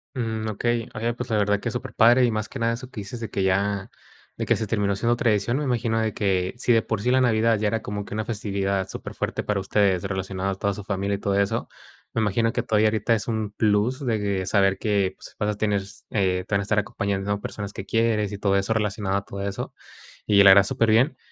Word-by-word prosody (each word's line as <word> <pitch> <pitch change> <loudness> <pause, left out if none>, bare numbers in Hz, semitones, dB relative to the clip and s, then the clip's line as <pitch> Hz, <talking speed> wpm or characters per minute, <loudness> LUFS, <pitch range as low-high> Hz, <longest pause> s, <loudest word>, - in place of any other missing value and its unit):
Mm, 110 -3 -2
okey, 120 +2 -1
oye, 115 +2 -1
pues 120 - -6
la 110 - +2
verdad 105 0 +2
que 115 - -3
es - - -6
superpadre, 125 -1 +3
y 120 - +4
más 110 -1 -2
que 135 - -8
nada 115 0 +1
eso 125 +2 -8
que 110 - -7
dices 100 +5 -7
de 115 -2 -6
que 100 - -1
ya, 100 +1 0 0.5
de - - -2
que - - +3
se 110 - -3
terminó 100 -1 0
siendo 115 +4 +1
tradición, 115 +1 +1
me 150 - -1
imagino 115 -4 0
de 110 -2 0
que, 95 -3 0
si 125 - +1
de 115 -2 +4
por 110 -3 -2
sí 125 - 0
la 130 +1 +4
Navidad 115 -2 +3
ya 105 +1 0
era 115 0 -1
como 105 -1 -5
que - - -8
una 110 +1 -1
festividad 100 -3 -2
superfuerte - - -4
para 105 -1 -1
ustedes, 95 -1 +1
relacionado 95 0 -2
a - - -3
toda 100 +1 -1
su 105 - -7
familia 100 0 -1
y - - -4
todo 100 -1 0
eso, 100 - 0 0.5
me 115 - 0
imagino 115 +2 +1
que 125 - 0
todavía 110 -2 +2
ahorita 110 +2 +1
es 105 - -4
un 110 -3 -2
plus 110 +6 +1
de 115 -3 +1
que 100 -2 -1
saber 95 0 +2
que, 100 -3 0
pues, - - -13
vas 105 - 0
a 105 - -2
tener, 105 -2 +1
s 95 - -13
eh, 95 -3 0
te - - -5
van 100 - +3
a - - -3
estar 105 +1 0
acompañando 100 -1 -1
personas 100 -1 -6
que 95 - -7
quieres 110 -3 +1
y 100 - -5
todo 100 -1 +1
eso 100 +2 0
relacionado 105 -2 0
a 100 - -4
todo 100 - -7
eso. 100 - -5 0.5
Y 100 -1 +6
la 100 - +9
verdad, 100 0 +8
superbién. 115 +7 +2
105 Hz, 250 wpm, -24 LUFS, 100-115 Hz, 0.5 s, la